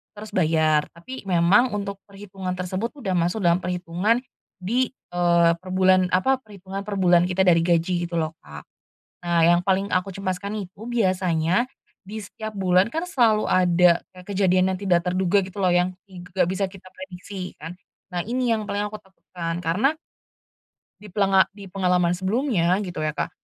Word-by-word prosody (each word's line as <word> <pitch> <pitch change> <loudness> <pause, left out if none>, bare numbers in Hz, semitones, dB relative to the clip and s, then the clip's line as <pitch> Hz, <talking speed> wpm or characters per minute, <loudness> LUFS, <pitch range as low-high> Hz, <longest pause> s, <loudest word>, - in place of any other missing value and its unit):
terus 210 +1 -9
bayar 155 -4 +2
tapi 260 +10 -9
memang 190 +8 +4
untuk 200 -1 -4
perhitungan 195 -2 -8
tersebut 185 +5 -3
udah 220 -9 -4
masuk 175 +4 0
dalam 170 +1 +3
perhitungan, 180 +5 0 0.5
di, 245 +6 +1 0.2
eee, 170 -1 +4
per 185 +1 -11
bulan 185 -1 +4
apa 260 +9 +2
perhitungan 195 -2 -8
per 205 - -3
bulan 175 -1 +4
kita 190 +1 +2
dari 170 -2 +5
gaji 175 +1 +1
gitu 170 - -3
loh 160 -1 -1
Kak, 75 -1 -11 0.6
nah 170 -1 +1
yang 175 +1 +4
paling 195 +1 +1
aku 185 0 -1
cemaskan 195 +1 -4
itu 195 +4 -14
biasanya, 185 -4 +1 0.4
di 210 +3 -7
setiap 215 +2 -7
bulan 190 +1 +2
kan 330 +3 -3
selalu 225 -9 +2
ada 180 -1 +4
kayak 180 -1 -14
kejadian 185 -1 +3
yang 185 - -9
tidak 180 -3 +3
terduga 185 +2 +2
gitu 190 - -13
loh 180 - +3
yang 180 +1 +1 0.2
i 180 - -10
g 175 - -10
gak - - +4
bisa 195 +1 0
kita 185 -1 -14
prediksi 185 0 -8
kan, 165 +2 -8 0.4
nah 175 - -2
ini 250 0 0
yang 215 -2 -1
paling 205 +1 -1
aku 215 - -7
takutkan 175 -3 -7
karena 215 - +1 1.1
di 210 - -11
pelenga 195 -2 +4
di 200 -2 -11
pengalaman 180 -2 +1
sebelumnya 190 -3 +1
gitu 175 -5 -4
ya 155 - -1
Kak, - - -3
185 Hz, 175 wpm, -23 LUFS, 175-200 Hz, 1.1 s, dari